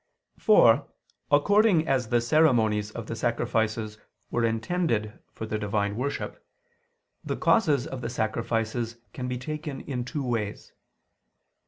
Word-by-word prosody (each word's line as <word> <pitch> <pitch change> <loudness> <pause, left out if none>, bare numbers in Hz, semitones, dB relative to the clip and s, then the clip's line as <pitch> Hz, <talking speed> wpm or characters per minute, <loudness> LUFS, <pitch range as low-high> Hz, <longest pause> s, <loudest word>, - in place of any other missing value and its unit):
For, - - +5 0.4
according 180 +3 +4
as 130 -4 +1
the 120 0 +3
ceremonies 120 -7 +3
of 115 0 -7
the 115 - -5
sacrifices 110 -2 -1 0.3
were 120 - 0
intended 115 -1 -1
for 110 - -6
the 110 -1 -3
divine 105 0 -1
worship, 140 +5 -4 0.8
the - - -3
causes 145 - +3
of 130 -2 -6
the 115 - -3
sacrifices 115 0 -2 0.2
can 125 -1 -4
be 125 0 -2
taken 150 +1 -5
in 125 -3 -4
two 140 +3 -4
ways. 115 -4 -3
120 Hz, 130 wpm, -27 LUFS, 110-140 Hz, 0.8 s, For